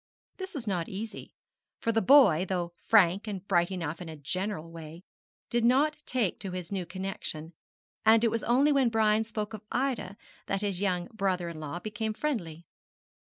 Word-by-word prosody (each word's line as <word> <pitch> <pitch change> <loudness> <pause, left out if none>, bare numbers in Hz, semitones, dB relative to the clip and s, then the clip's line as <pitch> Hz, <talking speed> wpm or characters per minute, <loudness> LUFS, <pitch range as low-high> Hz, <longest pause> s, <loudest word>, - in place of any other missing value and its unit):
This 380 -1 -5
was 260 -5 -4
not 180 -5 -1
easy, 215 +3 -6 0.5
for 230 - 0
the 225 0 +2
boy, 230 - +7
though 175 -2 -2
frank 200 -1 +4
and 200 -2 -5
bright 175 -2 +3
enough 170 -3 -4
in 170 - -6
a 160 - -7
general 175 +3 -3
way, 165 +1 -10 0.5
did 240 -1 +2
not 290 +6 +3
take 235 -8 0
to 190 -2 -5
his 180 -1 -5
new 185 -3 -3
connexion: 175 -3 -5 0.5
and 220 +1 +6
it 230 - +3
was 230 0 -1
only 270 +5 +4
when 270 -4 +4
Brian 220 -1 +3
spoke 215 -1 -4
of 215 - -6
Ida 250 -7 -1 0.3
that 195 0 -1
his 200 -3 -1
young 180 -3 0
brother 185 -5 0
in 165 -2 -8
law 155 +2 -5
became 215 +2 -3
friendly. 175 - -3
200 Hz, 180 wpm, -29 LUFS, 175-225 Hz, 0.5 s, boy